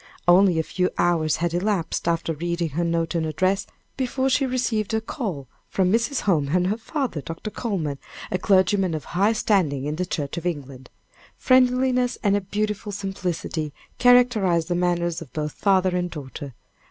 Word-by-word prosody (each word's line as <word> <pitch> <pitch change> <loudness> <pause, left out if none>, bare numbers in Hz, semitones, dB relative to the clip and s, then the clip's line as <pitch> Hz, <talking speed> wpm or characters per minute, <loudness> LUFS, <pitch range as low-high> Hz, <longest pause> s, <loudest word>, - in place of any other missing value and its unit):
Only 180 0 +6
a 160 - +2
few 180 +3 0
hours 165 -3 +2
had 170 0 -1
elapsed, 180 -2 -1
after 165 -1 0
reading 170 +1 -2
her 160 +4 -2
note 165 0 0
and 165 -2 0
address, 185 +5 0 0.3
before 265 0 0
she 270 +1 +2
received 230 -4 -1
a - - +2
call 205 - -5 0.2
from 185 -1 +1
Mrs. 235 +5 +1
Holmes 155 -8 +1
and 180 0 +3
her 205 +4 0
father, 245 - -3
Dr. 165 +8 -6
Coleman, 165 - -3 0.3
a 185 - 0
clergyman 190 -2 +3
of 155 - -5
high 200 +5 +2
standing 165 -11 +1
in 150 +1 -3
the 180 - -1
Church 145 -3 -3
of 170 - -5
England. 135 -6 -6 0.5
Friendliness 255 -1 +3
and 200 -2 +3
a 205 - +1
beautiful 210 +2 -3
simplicity 180 -6 -3 0.3
characterized 225 -10 +4
the - - +1
manners 175 -1 0
of 150 - -10
both 150 -1 -2
father 190 -1 +2
and 180 0 -1
daughter. 140 -4 -8
180 Hz, 170 wpm, -24 LUFS, 165-215 Hz, 0.5 s, Only